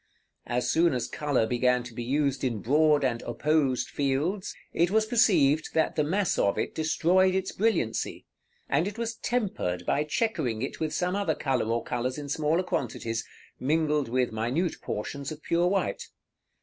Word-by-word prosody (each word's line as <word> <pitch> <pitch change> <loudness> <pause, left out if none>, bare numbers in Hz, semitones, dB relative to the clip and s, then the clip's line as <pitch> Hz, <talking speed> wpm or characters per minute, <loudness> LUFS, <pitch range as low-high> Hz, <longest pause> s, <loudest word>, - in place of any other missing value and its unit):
As 120 +1 -1
soon 165 -2 +3
as 125 - -1
color 145 -6 0
began 125 +1 +2
to 120 -1 -10
be 120 - -5
used 140 +1 0
in 120 -4 0
broad 150 +2 +4
and 120 -3 0
opposed 140 +1 +1
fields, 145 +8 -1 0.2
it 170 +1 +2
was 215 +2 +3
perceived 160 - +3
that 160 - +2
the 150 - +2
mass 190 +6 0
of 100 - +2
it - - -2
destroyed 180 +4 +2
its 190 0 -1
brilliancy, 205 - -1 0.4
and 175 - +1
it 205 +2 -6
was 230 -1 -3
tempered 185 - -2
by 145 - +1
chequering 150 - -1
it 135 - -5
with 155 -1 -1
some 180 +4 -1
other 200 -6 0
color 130 -5 0
or 115 +1 -1
colors 125 +2 -2
in 145 -1 -6
smaller 155 +4 +1
quantities, 115 -7 -2 0.4
mingled 150 -1 +1
with 125 0 +1
minute 120 +11 -1
portions 140 +7 -4
of 155 0 -9
pure 170 +1 +2
white. 195 +1 -1
150 Hz, 170 wpm, -27 LUFS, 125-175 Hz, 0.4 s, broad